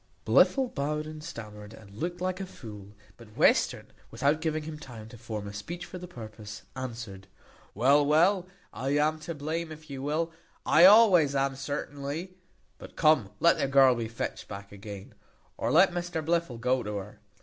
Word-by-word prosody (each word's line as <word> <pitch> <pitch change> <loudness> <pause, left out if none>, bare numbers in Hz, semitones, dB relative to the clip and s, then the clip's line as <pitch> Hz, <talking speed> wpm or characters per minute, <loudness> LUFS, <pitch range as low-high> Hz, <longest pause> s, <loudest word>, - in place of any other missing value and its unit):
Blifil 265 -3 +4
bowed 150 +2 -2
and 155 0 -9
stammered, 105 -7 -9
and 105 -3 -15
looked 175 +9 -4
like 185 +1 -2
a 195 - -5
fool; 105 - -11 0.2
but 110 -2 -16
Western, - - +3 0.2
without 140 +7 +1
giving 155 -1 -1
him 155 0 -7
time 115 -7 -10
to 120 - -12
form 110 -3 -6
a 100 - -7
speech 170 - -6
for 180 +1 -9
the 180 - -8
purpose, 110 - -10
answered, 115 -7 -7 0.5
"Well, 140 +4 +4
well, 175 +6 +3 0.3
I 135 +3 -1
am 155 +1 +1
to 165 +1 -6
blame, 160 +3 -3
if 155 -1 -11
you 135 -1 -6
will, 155 +4 -1 0.3
I 170 - +7
always 185 -9 +7
am, 135 0 +1
certainly; 145 +4 -5 0.5
but - - -12
come, 155 -10 +3
let 170 -1 +4
the 140 - +1
girl 135 -1 +6
be 115 -2 -3
fetched 115 +1 -5
back 100 0 -9
again, 100 -1 -9 0.4
or - - -2
let 180 +4 +6
Mr 175 -3 -3
Blifil 170 -7 0
go 125 +2 +1
to 105 -2 -5
her. 100 +1 -8
140 Hz, 180 wpm, -28 LUFS, 115-165 Hz, 0.5 s, I